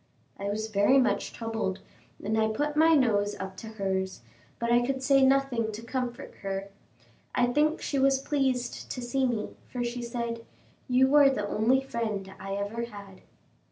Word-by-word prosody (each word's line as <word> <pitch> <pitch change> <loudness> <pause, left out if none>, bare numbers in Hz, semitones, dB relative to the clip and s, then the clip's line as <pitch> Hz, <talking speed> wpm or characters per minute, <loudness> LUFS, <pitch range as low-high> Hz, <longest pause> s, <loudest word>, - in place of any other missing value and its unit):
I 200 - -4
was 210 +2 -1
very 210 +5 +4
much 260 - +1
troubled, 225 -4 -3 0.5
and 215 +2 0
I 220 0 +3
put 295 +7 -1
my 320 +1 +6
nose 205 -7 +2
up 190 0 -5
to 225 - -8
hers, 190 -3 -2 0.4
but 235 0 -1
I 240 0 +5
could 265 +1 -2
say 275 0 +5
nothing 265 -4 +2
to 220 +2 -7
comfort 245 0 -4
her. 195 0 -4 0.7
I 245 - +4
think 305 +3 +2
she 280 - -1
was 270 0 +4
pleased 265 -4 -1
to - - -4
see 255 +2 0
me, 225 -4 -3
for 245 -1 -2
she 240 +1 -3
said, 235 -1 -4 0.5
"You 260 +2 +4
are 290 -2 +8
the 210 -7 -1
only 235 +6 +2
friend 215 -7 -3
I 195 +1 -5
ever 205 +4 -3
had." 200 -4 -11
235 Hz, 175 wpm, -28 LUFS, 205-265 Hz, 0.7 s, are